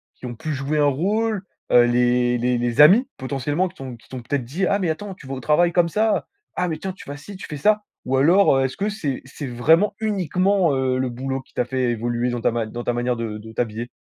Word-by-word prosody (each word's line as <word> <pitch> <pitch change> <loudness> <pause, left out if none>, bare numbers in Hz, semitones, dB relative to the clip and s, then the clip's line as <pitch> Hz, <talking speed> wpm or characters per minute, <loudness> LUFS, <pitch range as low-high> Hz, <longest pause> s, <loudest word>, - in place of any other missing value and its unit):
qui - - -11
ont 120 -1 -5
pu 155 +6 -4
jouer 140 +3 -1
un 145 - +4
rôle? 200 +8 0 0.3
Heu, 120 - +7
les 120 0 +2
les 125 +1 +1
les 120 +3 +2
amis 205 - +7
potentiellement 145 +7 -1
qui - - -21
t'ont 130 -2 -7
qui 115 - -22
t'ont 130 -1 -6
peut-être 130 +2 -2
dit: 160 +11 -2
«Ah 200 - +2
mais 180 -4 0
attends, 190 +5 -4
tu 160 - -15
vas 135 - -6
au - - -6
travail 155 +6 +3
comme 175 -1 +3
ça? 215 +4 +1 0.3
Ah 180 - 0
mais 160 -2 -3
tiens, 190 +4 -4
tu - - -14
vas 145 - -5
ci, 190 +7 -10
tu - - -8
fais 150 - -6
ça», 210 +7 +2 0.2
ou 130 +1 +1
alors, 165 +2 +5
heu, 135 - +2
est-ce 130 - -4
que 205 +2 -1
c'est 155 -11 -3
c'est 140 +2 -7
vraiment 160 - +3
uniquement, 190 -3 +1
heu, 130 -1 0
le 130 -1 0
boulot 130 +2 -4
qui - - -27
t'a - - 0
fait 125 -1 0
évoluer 120 +1 -1
dans 120 - -3
ta - - +2
ma 115 -1 -1
dans 120 +2 -6
ta - - 0
manière 120 +1 0
de 115 -2 -4
de 110 +1 -11
t'habiller? 115 0 -3
135 Hz, 260 wpm, -22 LUFS, 120-180 Hz, 0.3 s, Heu